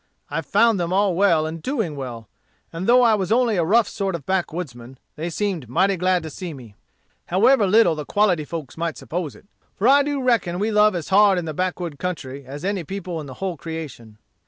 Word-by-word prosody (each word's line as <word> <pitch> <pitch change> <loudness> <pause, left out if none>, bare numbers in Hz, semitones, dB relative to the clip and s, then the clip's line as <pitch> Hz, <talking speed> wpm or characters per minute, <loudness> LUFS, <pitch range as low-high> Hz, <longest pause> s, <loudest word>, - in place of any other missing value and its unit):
I 155 +3 -1
found 220 +3 +3
them 170 0 -2
all 195 0 +2
well 170 -4 +3
and 160 +1 -5
doing 220 - -2
well; 120 -5 -7 0.5
and 170 +3 -4
though 250 +1 +6
I 230 -2 +5
was 195 -3 -1
only 235 -2 +3
a 175 - +2
rough 215 +6 +3
sort 195 -3 -3
of 150 -5 -8
backwoodsman, 155 -9 -3 0.2
they 165 +3 -4
seemed 175 - -3
mighty 190 +8 +2
glad 180 -1 +1
to 160 - -7
see 175 -1 -7
me, 120 -6 -12 0.5
however 215 +4 +4
little 205 -3 +5
the 155 -1 -5
quality 185 -3 +1
folks 150 -3 -7
might 165 0 -3
suppose 170 -3 -5
it. - - -18 0.3
For 205 - +1
I 280 +2 +6
do 285 0 -1
reckon 220 -9 +1
we 210 +4 -1
love 210 -1 +4
as 170 -3 -4
hard 200 0 +5
in 175 - -2
the 155 - -4
backwood 175 -3 -3
country 140 -7 -5
as 145 +5 -7
any 195 -2 -1
people 180 -1 -5
in 145 - -9
the 130 - -9
whole 190 -4 -4
creation. 145 -10 -8
180 Hz, 215 wpm, -22 LUFS, 155-205 Hz, 0.5 s, though